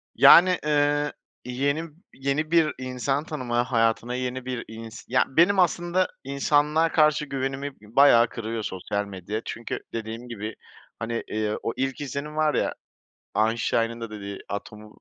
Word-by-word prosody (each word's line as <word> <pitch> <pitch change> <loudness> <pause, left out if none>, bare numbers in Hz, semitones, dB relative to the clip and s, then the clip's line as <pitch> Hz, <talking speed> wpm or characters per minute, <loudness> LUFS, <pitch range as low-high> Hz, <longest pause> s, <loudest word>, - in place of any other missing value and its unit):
Yani, 180 +1 +8
ııı, 145 0 +2 0.3
yeni 140 +6 -1 0.2
yeni 140 +4 -2
bir 165 -2 +4
insan 130 +3 -1
tanıma, 125 -6 -1
hayatına 115 +1 +1
yeni 125 0 -3
bir 125 -2 -4
ins 115 0 -9
ya 130 - +3
benim 175 +8 +4
aslında 175 +1 +2 0.2
insanlığa 150 +4 +2
karşı 155 -1 +3
güvenimi 135 0 -4
bi 105 +2 -17
bayağı 120 -4 +7
kırıyor 115 0 -4
sosyal 100 +2 -3
medya 100 +2 -5
çünkü 115 - -5
dediğim 115 +2 -5
gibi, 110 -1 -5 0.4
hani, 115 +1 -3
iii, 105 0 -1
o 115 - -1
ilk 135 +1 -2
izlenim 145 +2 -5
var 155 -1 +2
ya - - 0 0.6
Einstein'ın 115 +1 +1
da 115 - -5
dediği 100 -2 -7
atomu, 105 +1 -7
130 Hz, 145 wpm, -25 LUFS, 115-145 Hz, 0.6 s, Yani